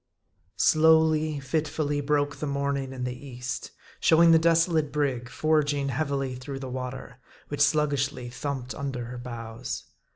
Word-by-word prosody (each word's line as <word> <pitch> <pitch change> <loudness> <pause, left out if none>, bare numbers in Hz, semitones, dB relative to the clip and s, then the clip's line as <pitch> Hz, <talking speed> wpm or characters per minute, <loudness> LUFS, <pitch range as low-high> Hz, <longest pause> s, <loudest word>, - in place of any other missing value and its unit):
SLOWLY, 155 -1 +4
fitfully, 145 +1 -1
broke 145 0 0
the 150 - -3
morning 140 -1 -1
in 130 -1 -5
the 125 0 -2
East, 125 -2 -5 0.3
showing 165 +1 +6
the 165 - +7
desolate 165 -2 +3
brig 135 -5 -1
forging 145 -2 +1
heavily 135 -1 -1
through 130 +2 -6
the 135 -1 -6
water, 125 0 -6 0.3
which 145 0 -3
sluggishly 140 -3 +1
thumped 130 0 -4
under 135 -4 -4
her 125 +1 -7
bows. 120 0 -6
140 Hz, 135 wpm, -27 LUFS, 125-150 Hz, 0.3 s, the